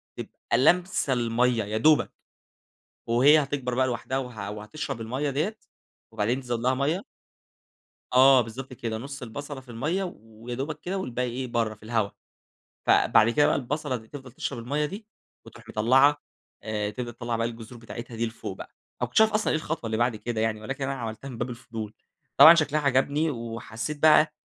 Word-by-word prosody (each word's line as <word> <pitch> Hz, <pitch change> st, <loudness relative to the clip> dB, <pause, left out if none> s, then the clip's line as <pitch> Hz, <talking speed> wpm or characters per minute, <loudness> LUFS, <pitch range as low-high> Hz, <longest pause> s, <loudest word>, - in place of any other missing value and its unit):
تبقى -, -, -9 dB, 0.2 s
لَامسة 175 Hz, 0 st, +3 dB
المَيّة 120 Hz, -1 st, +1 dB
يا 105 Hz, +2 st, -3 dB
دوبَك، 155 Hz, +6 st, +4 dB, 1.0 s
وهي 140 Hz, +6 st, +5 dB
هتكبر 135 Hz, -3 st, -3 dB
بقى 130 Hz, +1 st, +2 dB
لوحدها 125 Hz, +2 st, -2 dB
وه 125 Hz, -6 st, -5 dB
وهتشرب 115 Hz, +5 st, -6 dB
المَيّة 130 Hz, +6 st, -2 dB
دِيّة 180 Hz, +11 st, -2 dB, 0.5 s
وبعدين 120 Hz, +6 st, 0 dB
تزوّد 120 Hz, -2 st, -3 dB
لها 130 Hz, +2 st, +2 dB
مَيّة. 155 Hz, -, -1 dB, 1.1 s
آه 130 Hz, 0 st, +7 dB
بالضبط 125 Hz, +3 st, -6 dB
كده 115 Hz, -2 st, -4 dB
نُص 135 Hz, +2 st, -8 dB
البصلة 140 Hz, +4 st, -7 dB
في 130 Hz, -, -22 dB
المَيّة، 155 Hz, +12 st, -1 dB
ويا 115 Hz, +2 st, -9 dB
دوبَك 150 Hz, +4 st, -4 dB
كده 190 Hz, +3 st, -3 dB
والباقي 125 Hz, -6 st, -2 dB
إيه 130 Hz, +2 st, -4 dB
برا 115 Hz, -2 st, -1 dB
في 105 Hz, -, -26 dB
الهوا. 110 Hz, -2 st, 0 dB, 0.8 s
فبعد 110 Hz, +1 st, +5 dB
كده 145 Hz, +4 st, +4 dB
بقى -, -, +2 dB
البصلة 145 Hz, 0 st, -2 dB
دي 110 Hz, -1 st, -12 dB
تفضل 135 Hz, -4 st, -10 dB
تشرب 135 Hz, -, -4 dB
المَيّة 145 Hz, +6 st, -1 dB
دي 205 Hz, +6 st, -8 dB, 0.4 s
وتروح -, -, -14 dB
مطلّعة 135 Hz, +7 st, +4 dB, 0.4 s
آآ 105 Hz, -1 st, -2 dB
تبدأ 120 Hz, +2 st, -5 dB
تطلّع 120 Hz, 0 st, -3 dB
بقى 115 Hz, 0 st, 0 dB
الجذور 115 Hz, +1 st, -8 dB
بتاعتها 115 Hz, 0 st, -8 dB
دي 115 Hz, +1 st, 0 dB
لفوق 110 Hz, -, -7 dB
بقى، -, -, -8 dB
أنا -, -, -43 dB, 0.2 s
ما 125 Hz, -, +1 dB
كنتش 125 Hz, -, +2 dB
اعرف 220 Hz, 0 st, +5 dB
أصلًا 215 Hz, 0 st, +1 dB
إيه -, -, +2 dB
الخطوة 155 Hz, -6 st, -4 dB
اللي 110 Hz, 0 st, -1 dB
بعد 120 Hz, -1 st, +1 dB
كده 115 Hz, 0 st, -3 dB
يعني 110 Hz, -1 st, 0 dB
ولكن 135 Hz, +5 st, -4 dB
أنا 135 Hz, 0 st, -2 dB
عملتها 115 Hz, +1 st, -6 dB
من 120 Hz, -3 st, -8 dB
باب 120 Hz, +1 st, -2 dB
الفضول، 115 Hz, -3 st, -7 dB, 0.4 s
طبعًا 165 Hz, +2 st, +11 dB
شكلها 155 Hz, -2 st, +1 dB
عجبني 140 Hz, +3 st, +2 dB
وحسّيت 115 Hz, +3 st, -5 dB
بقى 155 Hz, 0 st, +6 dB
125 Hz, 180 wpm, -26 LUFS, 115-145 Hz, 1.1 s, طبعًا